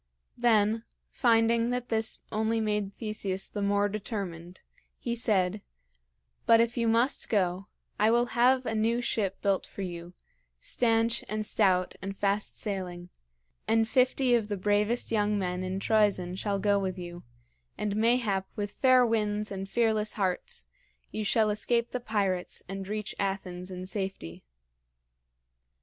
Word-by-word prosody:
Then, 225 -2 +2 0.3
finding 230 0 +3
that 245 0 -2
this 220 -1 0
only 220 +1 0
made 210 -2 -1
Theseus 200 -3 -3
the 205 - -5
more 200 0 +2
determined, 190 -4 -6 0.3
he 235 -1 -3
said: 205 -4 +1 0.9
"But 230 0 +7
if 235 +1 +2
you 235 -1 0
must 230 +4 +2
go, 190 -2 0 0.3
I 215 +1 +4
will 240 +1 +3
have 255 +2 +4
a 225 - -1
new 225 +2 +1
ship 210 -5 -1
built 195 -2 +1
for 200 - -7
you, 175 -1 -7 0.4
stanch 230 - +1
and 215 0 -1
stout 185 -4 +2
and 195 +1 -5
fast 200 +1 0
sailing; 180 -4 -4 0.6
and 225 0 +3
fifty 255 +1 +2
of 230 -3 +2
the 205 -1 -3
bravest 210 +5 +1
young 210 -1 +1
men 180 -2 -2
in 185 +1 -3
Troezen 200 -4 +2
shall 200 +1 -1
go 200 0 +2
with 190 -1 -3
you; 175 -1 -7 0.6
and 210 -1 -2
mayhap 215 -4 +1
with 205 -1 -3
fair 255 -1 +4
winds 210 -2 0
and 195 0 -5
fearless 220 -2 +1
hearts 185 -3 -2 0.5
you 215 - -3
shall 215 +1 +3
escape 235 +3 0
the 250 - -2
pirates 200 -6 -1
and 195 0 -6
reach 210 0 -4
Athens 190 -2 -3
in 185 0 -6
safety." 190 - -4
210 Hz, 145 wpm, -29 LUFS, 195-225 Hz, 0.9 s, But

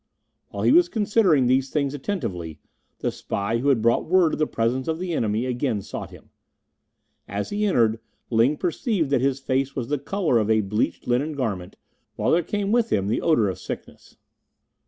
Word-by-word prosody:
While - - -5
he - - +4
was 345 +4 +5
considering 205 - +3
these 130 +2 +2
things 140 -2 -1
attentively, 115 - -4 0.4
the - - 0
spy 100 +4 -2
who 140 +4 +1
had 120 -6 +2
brought 115 +6 +2
word 180 -3 +4
of - - -3
the 155 - +2
presence 120 +3 -1
of 160 0 -1
the 180 0 -3
enemy 110 -3 0
again 125 -4 -1
sought - - -6
him. - - -16 1.0
As 100 0 -4
he 210 +1 0
entered, 115 - +2 0.3
Ling 120 +6 +3
perceived 180 - -1
that 140 - +3
his 135 0 +1
face 135 0 -1
was 120 -3 -3
the 145 -1 0
colour 160 - +1
of 110 0 -1
a 110 -1 +4
bleached 105 +2 -2
linen 135 +6 0
garment, 105 -10 -3 0.4
while - - 0
there 170 - +4
came 205 +3 -2
with 230 0 +2
him 100 0 +1
the 110 - 0
odour 120 -11 +3
of 95 - -4
sickness. - - -9
135 Hz, 190 wpm, -24 LUFS, 115-165 Hz, 1.0 s, was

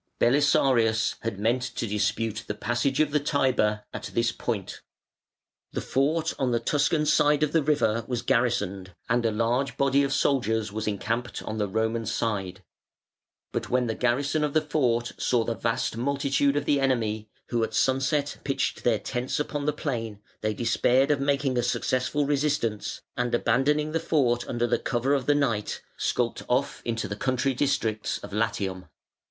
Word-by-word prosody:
Belisarius 120 -4 +3
had 115 -3 -4
meant 115 +5 +1
to 130 -2 -3
dispute 105 +1 -1
the 105 - -3
passage 120 +5 0
of 155 -2 +3
the 150 - +3
Tiber 125 -7 +1
at - - -5
this 115 0 +2
point. 110 -5 -4 0.9
The - - -1
fort 155 +5 0
on 130 - +1
the 120 -1 +1
Tuscan 150 +5 +1
side 150 0 +3
of 150 - +1
the 165 - +3
river 140 -7 +1
was 125 -2 -2
garrisoned, 100 -7 0
and 120 +1 +2
a - - +1
large 120 +5 0
body 140 0 +3
of 140 -1 0
soldiers 110 -6 +1
was 110 +1 -4
encamped 115 +4 -2
on 110 0 -4
the 105 - +1
Roman 110 +2 -1
side; 100 -5 -2 0.9
but - - -3
when 125 0 +2
the 115 - -1
garrison 140 +6 +1
of 150 -1 -1
the 155 - +5
fort 125 -6 0
saw 120 -2 +2
the 115 - -1
vast 115 -1 -1
multitude 140 +2 +1
of 145 - -1
the 145 -1 +2
enemy, 110 -5 0 0.2
who 120 -2 +1
at 110 0 -3
sunset 135 +2 +1
pitched 135 - -1
their 120 -3 +3
tents 125 +5 -3
upon 145 -1 -2
the - - +4
plain, 115 -8 -4 0.2
they 110 0 -1
despaired 125 +4 +2
of 145 - +2
making 140 -2 +1
a - - +3
successful 130 +4 0
resistance, 140 -7 -1
and 120 -1 0
abandoning 145 +6 +1
the 165 - 0
fort 125 -7 +1
under 120 0 +1
cover 130 +3 0
of 135 -3 0
the 145 - +4
night, 115 -8 -1
skulked 120 -1 -1
off 130 +3 0
into 115 -1 -2
the 105 - -4
country 130 +4 0
districts 115 -5 0
of - - -8
Latium. 100 -4 -2
125 Hz, 170 wpm, -26 LUFS, 110-140 Hz, 0.9 s, the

